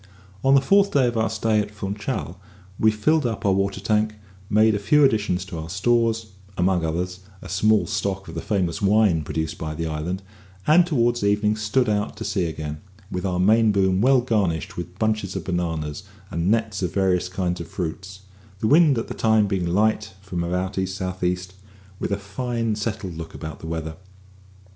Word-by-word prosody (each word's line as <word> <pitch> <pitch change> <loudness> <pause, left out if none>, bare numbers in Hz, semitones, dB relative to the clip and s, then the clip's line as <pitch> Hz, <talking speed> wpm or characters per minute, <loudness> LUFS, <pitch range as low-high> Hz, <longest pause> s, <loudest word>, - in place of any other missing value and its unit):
On 135 +1 +5
the 135 - +6
fourth 200 +7 +4
day 135 -3 +4
of 120 -1 0
our 110 -3 +1
stay 110 0 +1
at 105 0 -2
Funchal 105 -2 -4 0.4
we 110 - +5
filled 150 +9 +2
up 115 -5 -2
our 100 - +4
water 100 +1 0
tank, 110 +1 +1 0.3
made 110 +1 +4
a 100 - 0
few 145 +9 +4
additions 105 -8 +2
to 85 -3 -6
our 80 +1 -6
stores 115 +3 +1 0.3
(among 90 -1 +2
others, 90 +3 -2 0.2
a - - -8
small 105 +4 +3
stock 100 -2 -2
of - - -8
the - - -4
famous 90 -5 -1
wine 100 -4 +4
produced 80 +1 -3
by 80 -1 -4
the 85 +1 -3
island); 80 +5 -3 0.4
and 175 +3 +5
towards 120 -7 +1
evening 105 +1 +2
stood 110 +4 +1
out 105 -1 0
to - - -5
sea 95 -4 0
again, 75 -2 -5 0.3
with 90 +1 -2
our 90 -1 -1
main 110 +4 +4
boom 95 -1 +2
well 130 +1 +5
garnished 100 - -1
with 90 +1 -7
bunches 110 -3 -1
of 95 - -3
bananas 80 -3 -2 0.3
and 85 +3 0
nets 110 -2 0
of 90 - -1
various 95 -2 +1
kinds 90 -1 -2
of 85 - -7
fruits; 95 +3 -5 0.4
the 105 - -3
wind 150 -1 +5
at 115 - -2
the - - -5
time 110 -2 +3
being 95 -3 -1
light, 105 +2 +1
from 95 -3 -4
about 90 +2 -2
east 95 0 -2
south 95 0 -4
east, 90 +1 -1 0.5
with - - -3
a 100 - +1
fine 115 +3 -2
settled 105 -4 -3
look 80 0 -8
about 80 -3 -7
the 80 - -8
weather. 80 -1 -4
100 Hz, 195 wpm, -23 LUFS, 90-110 Hz, 0.5 s, the